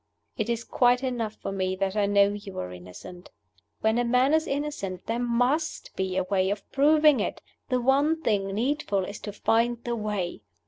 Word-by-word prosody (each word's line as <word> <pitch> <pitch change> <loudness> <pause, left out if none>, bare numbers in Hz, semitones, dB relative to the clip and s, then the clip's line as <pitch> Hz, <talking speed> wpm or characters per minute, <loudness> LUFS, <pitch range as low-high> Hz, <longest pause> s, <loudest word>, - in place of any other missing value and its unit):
It - - -2
is 235 0 -1
quite 245 +1 +2
enough 235 -4 -2
for - - -6
me 190 -1 -1
that 195 +1 -2
I 205 -1 +2
know 200 0 +4
you 205 -1 -7
are 90 0 -4
innocent. 90 - -11 0.5
When 220 +2 +2
a - - +2
man 250 +4 +3
is 315 0 +2
innocent, 275 -11 -3
there 230 +1 -2
must 245 +6 0
be 190 -1 -2
a 190 - +2
way 190 0 +1
of 205 0 -4
proving 300 +1 +5
it: - - -2 0.3
the 255 -1 +2
one 280 +6 +2
thing 205 -5 +1
needful 210 -2 -1
is 200 - -7
to 205 - -6
find 230 +3 +1
the 240 0 -2
way. 210 - -3
220 Hz, 190 wpm, -26 LUFS, 195-255 Hz, 0.5 s, proving